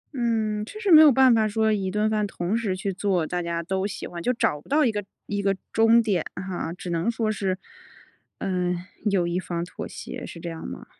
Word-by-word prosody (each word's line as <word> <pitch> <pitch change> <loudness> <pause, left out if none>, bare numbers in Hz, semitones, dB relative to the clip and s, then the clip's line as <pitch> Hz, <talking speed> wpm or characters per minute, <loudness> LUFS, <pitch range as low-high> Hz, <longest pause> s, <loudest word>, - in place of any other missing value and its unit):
嗯， 220 -4 0
确 420 - -9
实 410 -4 0
没 310 -1 +10
有 305 -2 +8
办 260 -1 +6
法 220 -1 +3
说 220 +1 +1
一 195 -2 -1
顿 210 +2 +1
饭 215 -1 0
同 180 +1 -2
时 220 -5 -1
去 195 +1 -3
做 185 -3 0
大 180 +3 -2
家 170 0 -2
都 190 +2 -1
喜 205 - -6
欢， 170 - -7
就 245 - +1
找 150 -10 0
不 - - -21
到 295 +2 +4
一 235 - +3
个 205 -1 -3 0.2
一 205 0 -2
个 195 0 +1 0.2
中 225 +1 +5
点 195 -7 +1
哈。 180 -2 -4
只 180 0 -6
能 170 +5 0
说 225 -2 0
是， 195 -3 -1 0.8
嗯， 180 -2 -1 0.3
有 190 -3 +2
一 175 +1 -1
方 170 -2 -3
妥 - - -7
协， - - -8
是 170 - -8
这 170 0 -5
样 165 - -7
吗？ - - -8
200 Hz, 245 characters per minute, -25 LUFS, 180-225 Hz, 0.8 s, 没